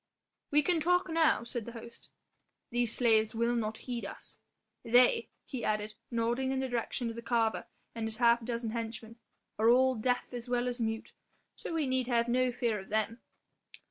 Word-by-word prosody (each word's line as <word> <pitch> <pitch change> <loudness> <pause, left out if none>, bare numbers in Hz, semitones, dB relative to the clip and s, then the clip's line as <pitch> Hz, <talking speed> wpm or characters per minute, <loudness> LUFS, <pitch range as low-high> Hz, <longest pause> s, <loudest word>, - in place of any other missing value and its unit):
"We 295 +1 +4
can 345 +1 +2
talk 360 +3 +2
now," 320 -5 +3
said 235 -1 -4
the 235 - -8
host; 235 0 -10 0.6
"these 240 -2 +1
slaves 220 -2 +3
will 235 +1 +1
not 220 -1 -2
heed 245 -2 -3
us. - - -6 0.5
They," 250 - +4 0.2
he 260 -4 -5
added, 215 0 -1 0.2
nodding 235 +3 0
in 265 - 0
the 265 - -1
direction 240 0 -2
of - - -9
the 235 - -6
carver 230 -2 0 0.3
and 225 -1 -3
his 220 0 -3
half 235 0 +4
dozen 230 -1 -3
henchmen, 230 0 -5 0.4
"are 225 +1 +5
all 260 +2 +5
deaf 245 +2 -1
as 245 0 -6
well 245 0 +1
as 245 0 -3
mute, 225 0 -3 0.4
so - - -7
we 315 -2 +1
need 260 -1 0
have 235 -2 +2
no 250 +1 +2
fear 235 -3 -1
of 190 - -11
them." 220 +2 -1
235 Hz, 185 wpm, -31 LUFS, 225-255 Hz, 0.6 s, are